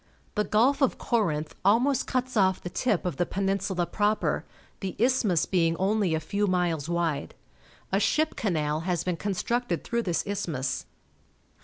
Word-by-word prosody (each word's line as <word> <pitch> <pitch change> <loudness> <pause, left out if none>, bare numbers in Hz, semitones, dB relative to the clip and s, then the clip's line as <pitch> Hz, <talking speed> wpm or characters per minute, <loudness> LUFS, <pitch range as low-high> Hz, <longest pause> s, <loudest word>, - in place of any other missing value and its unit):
The 210 - +1
Gulf 260 +7 +3
of 270 - +2
Corinth 160 -10 0
almost 240 +7 +3
cuts 255 0 -1
off 190 -3 +3
the 180 - -7
tip 205 -1 0
of 175 -6 -2
the 175 - +2
peninsula 195 -2 -1
proper, 210 +3 0 0.4
the 190 -2 -4
isthmus 230 -8 +2
being 165 -3 +2
only 195 -2 +1
a - - 0
few 205 +6 -1
miles 175 -5 0
wide. 170 -4 -1 0.6
A 195 - +3
ship 310 +9 +1
canal 155 -7 0
has 175 0 -1
been 180 -1 -1
constructed 235 +6 -1
through 235 -1 -1
this 175 -6 -1
isthmus. 160 -10 -2
195 Hz, 155 wpm, -27 LUFS, 170-220 Hz, 0.6 s, Gulf